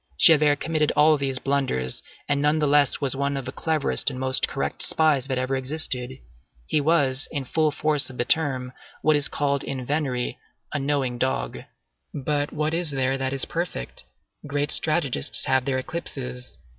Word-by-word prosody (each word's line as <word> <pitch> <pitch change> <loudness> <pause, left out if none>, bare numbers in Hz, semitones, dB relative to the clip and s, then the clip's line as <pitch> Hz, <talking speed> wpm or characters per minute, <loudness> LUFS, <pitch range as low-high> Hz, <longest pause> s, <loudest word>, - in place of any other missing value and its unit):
Javert 150 - +6
committed 155 -2 0
all 155 +1 +5
these 135 -2 -2
blunders, 130 - -1 0.3
and 145 -1 +1
nonetheless 150 -2 +3
was 135 -2 0
one 140 +1 -1
of 135 - -5
the 130 - -5
cleverest 155 0 0
and 130 -2 -7
most 130 0 +2
correct 135 - -3
spies 150 -5 +3
that 130 -2 -2
ever 130 +1 -1
existed. 130 -2 -1 0.5
He 150 - +1
was, 140 -3 +2
in 140 -3 -4
the 125 - -16
full 155 -1 +2
force 150 -1 +1
of 130 - -11
the 120 - 0
term, 130 -5 0 0.3
what 155 0 +4
is 145 -1 +4
called 140 -1 -1
in 130 -2 -5
venery 135 -4 -2 0.3
a 145 - -1
knowing 135 -3 -1
dog. 60 - -2 0.6
But 145 +1 -1
what 155 +1 -2
is 170 -1 +2
there 135 -1 0
that 130 0 -1
is 135 -1 +1
perfect? 170 - -5 0.4
Great 145 0 -1
strategists 145 - +2
have 130 -1 +1
their 135 -2 0
eclipses. 130 - -4
140 Hz, 170 wpm, -24 LUFS, 130-150 Hz, 0.6 s, Javert